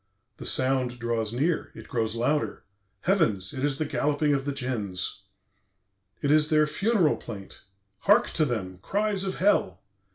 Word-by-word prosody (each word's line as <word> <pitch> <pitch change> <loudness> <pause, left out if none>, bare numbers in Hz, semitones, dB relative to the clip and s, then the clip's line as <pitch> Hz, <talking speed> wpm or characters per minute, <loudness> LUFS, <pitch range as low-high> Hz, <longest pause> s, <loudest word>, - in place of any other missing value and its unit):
"The - - -8
sound 130 -2 +2
draws 115 -2 -1
near. 150 +8 -1
It - - -11
grows 110 -2 -1
louder! 145 +6 -1 0.4
Heavens! 110 - +1
It 130 - -4
is 145 -2 +1
the 155 - -1
galloping 150 0 +1
of 135 -1 -1
the 145 - -1
Djinns. 100 -9 -3 1.0
"It 140 - +2
is 150 0 +5
their 155 -1 +4
funeral 180 +2 +2
plaint. 100 -3 -9 0.4
Hark 210 +4 +4
to 155 - +2
them! 95 -8 -4
Cries 205 - 0
of 190 - -2
Hell! 165 - +2
140 Hz, 155 wpm, -27 LUFS, 115-155 Hz, 1.0 s, is